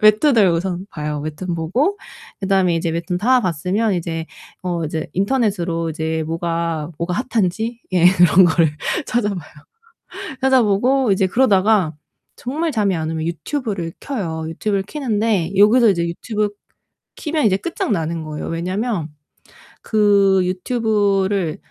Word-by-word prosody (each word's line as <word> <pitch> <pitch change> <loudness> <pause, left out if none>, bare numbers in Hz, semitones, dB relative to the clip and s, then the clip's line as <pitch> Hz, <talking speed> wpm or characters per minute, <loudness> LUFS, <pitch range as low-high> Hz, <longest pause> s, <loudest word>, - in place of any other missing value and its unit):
웹툰을 215 -1 +5
우선 175 +2 -1
봐요. 150 -1 -4
웹툰 155 +4 -4
보고 245 - 0 0.4
그다음에 190 -3 +2
이제 165 +1 -1
웹툰 170 +2 -2
다 250 +6 +3
봤으면 185 +5 0
이제 165 -2 -3 0.4
어 175 -2 -2
이제 160 +1 -3
인터넷으로 190 -6 0
이제 160 0 -2
뭐가 165 -1 -2
뭐가 170 +1 -2 0.2
핫한지 225 +3 -1
예 175 -1 +5
그런 180 0 +6
거를 165 -2 +3 0.4
찾아봐요. 205 -9 -2 0.9
찾아보고 255 -1 +3
이제 190 0 +1
그러다가 200 -5 +3 0.4
정말 310 +6 -2
잠이 205 -7 +1
안 160 -1 -3
오면 160 -1 -3
유튜브를 180 - -3
켜요. 165 - -4
유튜브를 195 +4 -1
켜는데 215 - -1
여기서 215 +4 +6
이제 170 -4 +1
유튜브 210 +5 -2 0.7
키면 310 -3 -1
이제 195 -3 +4
끝장나는 170 - -2
거예요. 155 -1 -6
왜냐하면 180 +1 -2 0.7
그 200 -3 +3
유튜브를 195 -3 0
190 Hz, 300 characters per minute, -20 LUFS, 165-220 Hz, 0.9 s, 그런